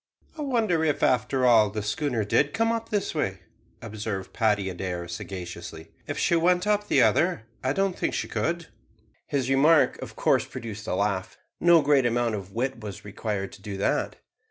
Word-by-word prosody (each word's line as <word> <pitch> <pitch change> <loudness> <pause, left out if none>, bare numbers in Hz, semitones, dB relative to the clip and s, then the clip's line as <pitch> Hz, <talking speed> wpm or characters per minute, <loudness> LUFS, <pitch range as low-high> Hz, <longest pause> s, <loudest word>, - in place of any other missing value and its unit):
"I 310 - -6
wonder 225 - +1
if, 150 -2 0
after 130 +1 +2
all, 110 -4 +6
the 105 +1 -4
schooner 115 +2 -1
did 145 - +2
come 225 +1 +2
up 230 0 -3
this 205 -2 -1
way," 95 - -2 0.4
observed 105 -3 -5
Paddy 105 -4 +1
Adair 90 -1 -4
sagaciously. 85 -3 -7 0.2
"If - - -4
she 170 - +2
went 180 +2 +3
up 210 0 +1
the - - +4
other, 175 -8 +2 0.2
I 130 +1 +1
don't 195 +2 0
think - - -1
she - - -2
could." 170 +1 -2 0.6
His 135 -3 -1
remark 145 +4 +4
of - - -8
course - - +2
produced 110 -2 -7
a - - 0
laugh. 100 -1 -1 0.2
No 170 -2 +6
great 140 -3 +4
amount 120 -1 0
of 100 -2 -5
wit 125 +3 -2
was 105 -3 -8
required 105 -1 -4
to - - -14
do 100 -1 -6
that. 100 - 0
120 Hz, 180 wpm, -26 LUFS, 100-165 Hz, 0.6 s, all